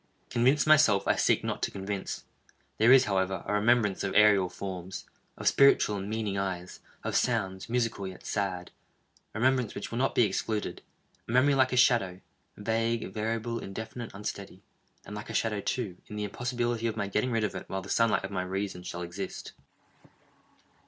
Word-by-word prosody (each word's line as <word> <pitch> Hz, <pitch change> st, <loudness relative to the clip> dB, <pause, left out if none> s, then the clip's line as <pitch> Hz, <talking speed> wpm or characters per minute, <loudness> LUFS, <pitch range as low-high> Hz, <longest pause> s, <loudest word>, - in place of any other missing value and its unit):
Convinced 130 Hz, +5 st, +3 dB
myself, 150 Hz, -10 st, +5 dB
I -, -, +4 dB
seek -, -, +2 dB
not -, -, -3 dB
to -, -, 0 dB
convince. 95 Hz, 0 st, -5 dB, 0.6 s
There 110 Hz, +3 st, +6 dB
is, 135 Hz, 0 st, +8 dB
however, 95 Hz, -4 st, -1 dB
a -, -, -2 dB
remembrance 105 Hz, -1 st, +2 dB
of 100 Hz, -, -2 dB
aerial 105 Hz, -3 st, +5 dB
forms—of 95 Hz, 0 st, -7 dB
spiritual 140 Hz, -6 st, +5 dB
and 100 Hz, +1 st, -5 dB
meaning 105 Hz, -3 st, -2 dB
eyes—of 95 Hz, -2 st, -5 dB
sounds, 95 Hz, +2 st, 0 dB
musical 115 Hz, -5 st, -1 dB
yet 95 Hz, -1 st, -10 dB
sad—a 95 Hz, +1 st, -6 dB
remembrance 125 Hz, -2 st, +2 dB
which -, -, -6 dB
will 115 Hz, -, -2 dB
not 135 Hz, -, +1 dB
be -, -, +5 dB
excluded; 105 Hz, +1 st, -2 dB, 0.5 s
a -, -, -5 dB
memory 130 Hz, +4 st, +4 dB
like 130 Hz, -1 st, +3 dB
a 125 Hz, -, 0 dB
shadow—vague, 115 Hz, 0 st, 0 dB
variable, 115 Hz, +2 st, -2 dB
indefinite, 110 Hz, +4 st, -6 dB
unsteady; 100 Hz, -2 st, -6 dB, 0.4 s
and 105 Hz, -, -8 dB
like 105 Hz, -, -7 dB
a -, -, -5 dB
shadow, 110 Hz, -2 st, 0 dB
too, 100 Hz, -5 st, -3 dB
in 105 Hz, -, -8 dB
the 105 Hz, -, -3 dB
impossibility 120 Hz, +1 st, -2 dB
of 110 Hz, -, -3 dB
my 100 Hz, -, -1 dB
getting 105 Hz, +5 st, 0 dB
rid 115 Hz, -2 st, 0 dB
of 105 Hz, -, -1 dB
it 95 Hz, -, -7 dB
while 95 Hz, 0 st, -3 dB
the -, -, -10 dB
sunlight 105 Hz, -2 st, +2 dB
of 95 Hz, -, -7 dB
my 95 Hz, -2 st, -1 dB
reason 95 Hz, 0 st, -3 dB
shall 90 Hz, 0 st, -6 dB
exist. 90 Hz, +2 st, -6 dB
105 Hz, 170 wpm, -29 LUFS, 95-115 Hz, 0.6 s, is